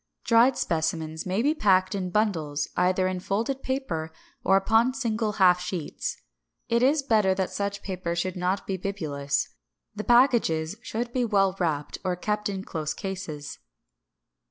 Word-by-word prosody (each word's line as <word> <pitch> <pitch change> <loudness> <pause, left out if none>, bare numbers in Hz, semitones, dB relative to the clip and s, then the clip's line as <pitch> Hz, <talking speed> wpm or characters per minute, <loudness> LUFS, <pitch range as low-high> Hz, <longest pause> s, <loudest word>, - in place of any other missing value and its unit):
565. - - -22
Dried 240 +3 +5
specimens 160 -1 -1
may 190 +5 0
be 295 +3 +3
packed 190 -10 +3
in 190 -2 -2
bundles, 165 -8 0
either 185 +1 +2
in 185 -1 -2
folded 225 +9 -2
paper 175 - -3 0.3
or 195 - +5
upon 225 +6 +3
single 225 -5 -1
half 180 -3 +4
sheets. 180 -4 -4 0.5
It 235 0 +2
is 280 +3 +3
better 210 -7 +3
that 190 -1 -1
such 200 0 -3
paper 180 -3 -3
should 180 +1 -2
not 185 +2 -1
be 190 - -2
bibulous. 145 -7 -2 0.5
The 210 - -4
packages 230 -10 +3
should 235 +2 -4
be 255 - +1
well 195 -4 +2
wrapped 150 -5 -1
or 180 -1 0
kept 210 +3 -2
in 190 -1 -4
close 155 -4 -4
cases. 180 -7 -6
190 Hz, 155 wpm, -26 LUFS, 170-220 Hz, 0.5 s, Dried